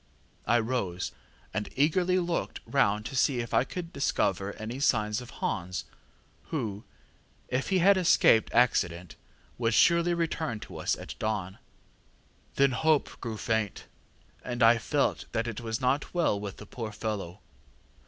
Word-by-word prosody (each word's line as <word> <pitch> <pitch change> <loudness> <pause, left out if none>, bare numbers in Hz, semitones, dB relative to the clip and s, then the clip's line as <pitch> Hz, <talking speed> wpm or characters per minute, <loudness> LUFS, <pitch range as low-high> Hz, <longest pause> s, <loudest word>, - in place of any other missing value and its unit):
I 115 +2 +4
rose, 110 -7 -2 0.4
and 105 +2 -2
eagerly 175 +6 +2
looked 175 -2 -2
round 105 -6 +1
to 135 - -5
see 130 0 +2
if 120 0 -4
I - - +4
could 170 +4 -7
discover 100 -7 0
any 115 +4 -6
signs 110 -4 +1
of 125 - -10
Hans, 90 +1 -3 0.6
who, 110 -9 -4 0.6
if 130 +2 -1
he 190 - +3
had 195 +2 +5
escaped 160 -10 +4
accident, 90 -8 +1 0.4
would 115 -2 +1
surely 170 0 +4
return 160 -7 -2
to - - -9
us - - 0
at - - -8
dawn, 100 -4 -2 1.0
but - - -21
there 140 - +6
were - - -2
none. - - -5
Then 125 - -3
hope 160 -2 +1
grew 115 -3 -4
faint, 110 -2 -1 0.6
and 120 -2 -1
I 115 +1 +6
felt - - 0
that 115 +1 0
it 115 -1 -5
was 115 -1 -3
not 135 +6 0
well 160 -12 +2
with 100 -1 -6
the 105 - -10
poor 110 0 -6
fellow. 105 -4 -4
115 Hz, 165 wpm, -29 LUFS, 105-145 Hz, 1.0 s, there